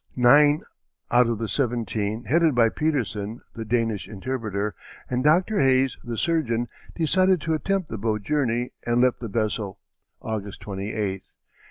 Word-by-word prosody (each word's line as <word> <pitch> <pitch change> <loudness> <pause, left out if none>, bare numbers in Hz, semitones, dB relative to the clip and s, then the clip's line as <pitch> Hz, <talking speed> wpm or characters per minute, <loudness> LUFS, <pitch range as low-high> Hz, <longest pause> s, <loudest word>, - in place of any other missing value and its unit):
Nine 145 +4 +5 0.5
out 125 0 +5
of 115 -1 0
the 115 +1 -3
seventeen, 115 -3 -1
headed 160 0 +3
by 115 -2 +5
Petersen, 115 -7 -2
the 115 - -5
Danish 115 -2 -1
interpreter, 105 -2 -3 0.3
and 125 0 -1
Dr. 180 +7 +3
Hayes, 130 0 +3
the 120 -1 -5
surgeon, 120 -9 0 0.3
decided 185 +3 +3
to 160 - -1
attempt 185 +2 -1
the 110 - -5
boat 105 -1 -1
journey 125 -3 0
and 120 0 +1
left 125 -1 +3
the 115 - -5
vessel 105 -2 -2 0.4
August 105 -3 -5
28th. 100 -1 -4
120 Hz, 145 wpm, -25 LUFS, 110-145 Hz, 0.5 s, Nine